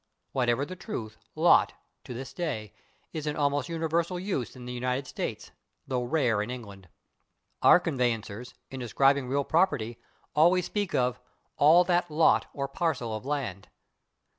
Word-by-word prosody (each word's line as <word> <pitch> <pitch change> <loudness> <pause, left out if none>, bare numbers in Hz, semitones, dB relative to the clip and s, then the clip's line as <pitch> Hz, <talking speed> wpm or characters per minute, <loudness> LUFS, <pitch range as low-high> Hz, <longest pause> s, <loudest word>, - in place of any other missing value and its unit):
Whatever 125 +1 +1
the 185 - -7
truth, 110 - -6 0.2
/lot/, - - +6
[Pg052] - - -19 0.3
to - - -6
this 130 +2 -7
day, 135 - -4 0.4
is 155 -2 -4
in 150 - -1
almost 145 -1 0
universal 165 +2 -1
use 175 - -3
in 125 -1 -10
the 125 - -5
United 125 +2 -2
States, - - -5 0.3
though 125 -1 -1
rare 120 -5 +1
in 105 - -4
England. 100 -7 -8 0.7
Our - - +7
conveyancers, 125 - -2 0.2
in 135 - -6
describing 135 +2 +2
real 140 +2 0
property, 135 -9 +1 0.4
always 175 +3 +4
speak 205 -3 -2
of 125 0 +1 0.4
"all 160 +5 +6
that 175 0 +1
/lot/ 155 0 +3
or 140 -1 -3
/parcel/ 135 - -2
of 110 +5 -7
land." 125 -10 -3
135 Hz, 155 wpm, -28 LUFS, 120-165 Hz, 0.7 s, Our